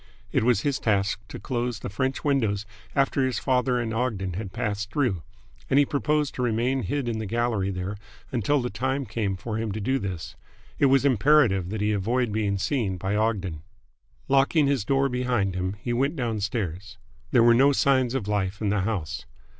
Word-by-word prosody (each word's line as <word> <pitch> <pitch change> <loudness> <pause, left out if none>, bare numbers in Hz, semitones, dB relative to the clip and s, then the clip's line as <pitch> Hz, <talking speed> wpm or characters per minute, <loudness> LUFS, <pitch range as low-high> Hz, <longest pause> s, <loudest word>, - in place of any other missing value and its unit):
It - - +2
was 120 -3 +3
his 140 -1 0
task 100 -2 +1
to - - -8
close 120 +2 -2
the - - -6
French 130 +7 -2
windows 110 -8 +1 0.3
after 135 0 +2
his 130 -2 0
father 125 -1 +1
and 115 -2 -2
Ogden 110 -6 -1
had 95 +1 -5
passed 105 -3 -2
through, 110 - 0 0.5
and 135 - +3
he 145 - +6
proposed 150 0 0
to - - -4
remain 125 +3 +1
hid 140 -2 -2
in 115 -2 -2
the 110 - -4
gallery 115 -3 0
there 95 +2 -4 0.3
until 130 +3 +1
the 125 - -3
time 130 +2 -1
came 105 -5 -2
for 110 +3 -4
him 110 -2 -2
to 110 - -4
do 130 +6 0
this. 95 -6 -5 0.4
It 140 - +5
was 135 +1 +4
imperative 125 - +4
that 105 +1 -3
he 105 +1 +2
avoid 115 +4 0
being 105 -2 0
seen 100 -2 -1
by 95 +3 -2
Ogden. 100 -7 -1 0.7
Locking 140 +3 +4
his 140 -6 +1
door 135 +2 +2
behind 125 -6 0
him, 95 +2 -2
he 120 +3 -2
went 135 +6 +1
downstairs. 105 - -3 0.3
There 120 - +5
were 120 0 +7
no 135 +4 +5
signs 130 -2 +2
of 115 -7 -2
life 105 -1 -1
in 105 - 0
the 100 -1 +1
house. 95 -6 -3
115 Hz, 195 wpm, -26 LUFS, 100-130 Hz, 0.7 s, were